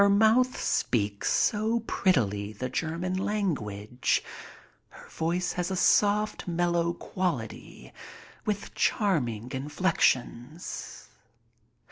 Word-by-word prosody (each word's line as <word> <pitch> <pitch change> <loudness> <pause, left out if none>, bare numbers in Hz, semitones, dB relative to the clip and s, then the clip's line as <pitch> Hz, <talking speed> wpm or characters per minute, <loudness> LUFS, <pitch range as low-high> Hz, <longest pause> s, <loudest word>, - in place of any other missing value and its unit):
Her 200 - +6
mouth 220 +5 +4
speaks 100 -4 0
so 220 +2 +2
prettily 110 - 0
the 130 +5 -4
German 170 +6 -2
language. 125 - -1 0.7
Her - - -14
voice 175 +3 -1
has 180 0 -2
a 190 - -1
soft, 210 +3 +2
mellow 170 -1 +1
quality, 125 - -4 0.5
with 205 -1 -3
charming 125 - 0
inflections. 140 -1 -1
170 Hz, 90 wpm, -28 LUFS, 125-200 Hz, 0.7 s, Her